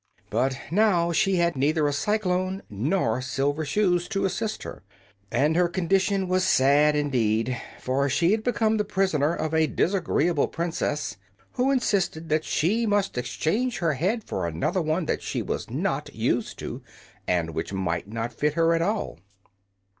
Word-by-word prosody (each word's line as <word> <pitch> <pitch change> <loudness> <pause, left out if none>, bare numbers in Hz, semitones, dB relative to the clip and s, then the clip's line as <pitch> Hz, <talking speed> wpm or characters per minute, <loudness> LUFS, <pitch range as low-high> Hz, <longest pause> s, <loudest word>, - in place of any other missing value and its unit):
But 130 +4 +1
now 180 -4 +3
she 190 +3 +2
had 170 -2 +2
neither 150 +3 +2
a 145 - 0
cyclone 190 +1 0
nor 120 - 0
silver 140 +4 -1
shoes 175 +3 +1
to 195 -2 -1
assist 215 +3 -2
her, - - -8 0.5
and 150 +3 +2
her 175 0 +4
condition 190 +2 +1
was 185 0 +1
sad 145 -1 +4
indeed. 125 -4 +1 0.2
For 140 +2 0
she 170 +7 +2
had 215 0 +1
become 220 -2 +1
the 210 - +1
prisoner 185 -6 +1
of 155 0 -3
a 160 -1 +3
disagreeable 170 -4 +1
princess 160 - -2 0.3
who 255 +1 +1
insisted 190 -11 0
that 155 +1 +1
she 215 +9 +1
must 205 -2 +1
exchange 215 - -1
her 165 -3 +1
head 195 - -1
for 90 - -3
another 85 - -1
one 160 +2 0
that - - -1
she - - -3
was - - -4
not - - -2
used - - -1
to, - - -6 0.5
and 85 -2 0
which 80 +3 -4
might 95 -2 -2
not 115 +2 -4
fit 150 0 0
her 165 0 +3
at 165 - +1
all. 205 - -2
165 Hz, 160 wpm, -25 LUFS, 140-195 Hz, 0.5 s, her